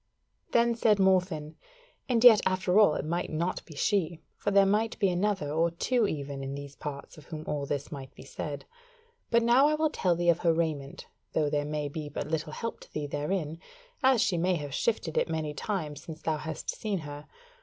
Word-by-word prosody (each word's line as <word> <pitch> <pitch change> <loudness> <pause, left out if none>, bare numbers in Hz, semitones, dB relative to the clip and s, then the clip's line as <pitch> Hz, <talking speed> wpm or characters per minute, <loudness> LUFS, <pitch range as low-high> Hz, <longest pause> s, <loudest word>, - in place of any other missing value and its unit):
Then 235 0 +4
said 225 -2 +3
Morfinn: 180 -5 +1 0.5
"And 235 -2 +2
yet 230 -4 +9
after 185 +1 +2
all 205 -8 +6
it - - -3
might 170 +3 -2
not 170 +3 -2
be 160 - -12
she: 170 -1 0 0.2
for - - -2
there 200 -1 +5
might 215 +3 +1
be 195 - +2
another 185 -4 0
or 165 +2 +2
two 220 +7 +1
even 140 -4 -4
in 135 +1 -4
these 140 0 -8
parts 145 +2 -7
of 150 - -16
whom 155 -2 -7
all 145 -1 -2
this 145 +1 -3
might 135 -3 -7
be - - -11
said. 140 +1 -6 0.6
But 235 0 +4
now 245 +5 +5
I 305 - +2
will 310 0 +1
tell 180 - +1
thee 175 0 +1
of 170 0 +4
her 170 -2 +3
raiment, 155 -4 -2 0.3
though 150 -2 +1
there 145 -1 0
may 150 0 -2
be 150 +1 -5
but 145 - -4
little 155 0 -2
help 230 +6 -4
to - - -15
thee 150 - -3
therein, 150 +2 -2 0.4
as 260 -4 +4
she 185 -8 +1
may 180 +2 +2
have 145 -4 -5
shifted 195 - 0
it - - -1
many 155 -2 -2
times 155 -3 -3
since 160 -1 -10
thou 160 -1 0
hast 155 +1 -4
seen 210 -3 -3
her. 145 0 -8
165 Hz, 210 wpm, -29 LUFS, 150-200 Hz, 0.6 s, yet